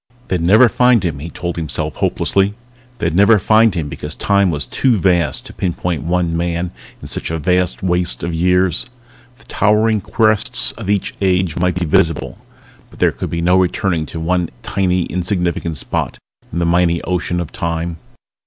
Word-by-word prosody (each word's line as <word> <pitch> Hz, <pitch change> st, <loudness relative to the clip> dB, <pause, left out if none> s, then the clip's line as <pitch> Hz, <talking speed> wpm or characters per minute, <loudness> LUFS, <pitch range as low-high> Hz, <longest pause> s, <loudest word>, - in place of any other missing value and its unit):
They'd 90 Hz, -3 st, 0 dB
never 105 Hz, +9 st, +6 dB
find 120 Hz, -1 st, +3 dB
him, 80 Hz, -5 st, -2 dB
he 80 Hz, +4 st, -6 dB
told 85 Hz, 0 st, -5 dB
himself 80 Hz, -3 st, -3 dB
hopelessly. 100 Hz, +1 st, +1 dB, 0.4 s
They'd 85 Hz, -8 st, -1 dB
never 100 Hz, +5 st, +5 dB
find 110 Hz, +1 st, +3 dB
him 80 Hz, -4 st, -2 dB
because -, -, -5 dB
Time 100 Hz, -2 st, +2 dB
was 75 Hz, -4 st, -2 dB
too 125 Hz, -4 st, +1 dB
vast 85 Hz, -5 st, +1 dB
to -, -, -10 dB
pinpoint 90 Hz, -3 st, -2 dB
one 85 Hz, +1 st, 0 dB
man 85 Hz, +1 st, -2 dB, 0.3 s
in -, -, -7 dB
such -, -, -3 dB
a 80 Hz, -, -2 dB
vast 90 Hz, +4 st, 0 dB
waste 90 Hz, -1 st, 0 dB
of 85 Hz, 0 st, -2 dB
years. 90 Hz, +1 st, +1 dB, 0.5 s
The -, -, -18 dB
towering 105 Hz, 0 st, +2 dB
crests 110 Hz, +3 st, +1 dB
of 105 Hz, -4 st, -8 dB
each 100 Hz, -2 st, 0 dB
age 95 Hz, -3 st, +1 dB
might 90 Hz, +1 st, +1 dB
be 90 Hz, -1 st, -1 dB
visible 80 Hz, 0 st, 0 dB, 0.5 s
but -, -, -17 dB
there -, -, +3 dB
could -, -, -5 dB
be 85 Hz, -, -2 dB
no 90 Hz, +2 st, +3 dB
returning 90 Hz, -3 st, 0 dB
to 80 Hz, -, -6 dB
one 90 Hz, +1 st, 0 dB
tiny 90 Hz, -2 st, 0 dB
insignificant 90 Hz, -3 st, -2 dB
spot -, -, -3 dB, 0.3 s
in -, -, -5 dB
the 85 Hz, -, +1 dB
mighty 85 Hz, 0 st, +2 dB
ocean 90 Hz, -1 st, -1 dB
of 85 Hz, -3 st, -5 dB
Time. 85 Hz, 0 st, -3 dB
90 Hz, 175 wpm, -17 LUFS, 85-100 Hz, 0.5 s, never